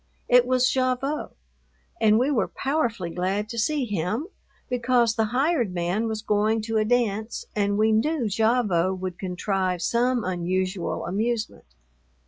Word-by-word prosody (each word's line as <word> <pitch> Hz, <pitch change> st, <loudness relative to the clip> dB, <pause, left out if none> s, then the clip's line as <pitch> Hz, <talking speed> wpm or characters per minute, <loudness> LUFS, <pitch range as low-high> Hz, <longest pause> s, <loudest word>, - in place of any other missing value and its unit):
It 245 Hz, 0 st, +5 dB
was 255 Hz, 0 st, +3 dB
Gavotte, 260 Hz, +3 st, -1 dB, 0.7 s
and 215 Hz, -1 st, +5 dB
we 260 Hz, +5 st, +2 dB
were 250 Hz, -, +1 dB
powerfully 235 Hz, -, -2 dB
glad 190 Hz, +4 st, -1 dB
to 235 Hz, -, -4 dB
see 285 Hz, +4 st, +1 dB
him 210 Hz, -, -2 dB, 0.4 s
because 245 Hz, -2 st, +2 dB
the 220 Hz, 0 st, +1 dB
hired 245 Hz, -, 0 dB
man 180 Hz, +6 st, 0 dB
was 220 Hz, -1 st, -4 dB
going 215 Hz, +1 st, +1 dB
to 225 Hz, 0 st, -1 dB
a 215 Hz, -, +2 dB
dance 220 Hz, -2 st, 0 dB
and 200 Hz, -1 st, +1 dB
we 220 Hz, +1 st, +3 dB
knew 255 Hz, +3 st, +1 dB
Gavotte 205 Hz, -4 st, +1 dB
would 185 Hz, -1 st, -5 dB
contrive 185 Hz, -1 st, -1 dB
some 240 Hz, +3 st, +1 dB
unusual 185 Hz, +1 st, -2 dB
amusement. 215 Hz, -, -3 dB
220 Hz, 140 wpm, -25 LUFS, 190-245 Hz, 0.7 s, It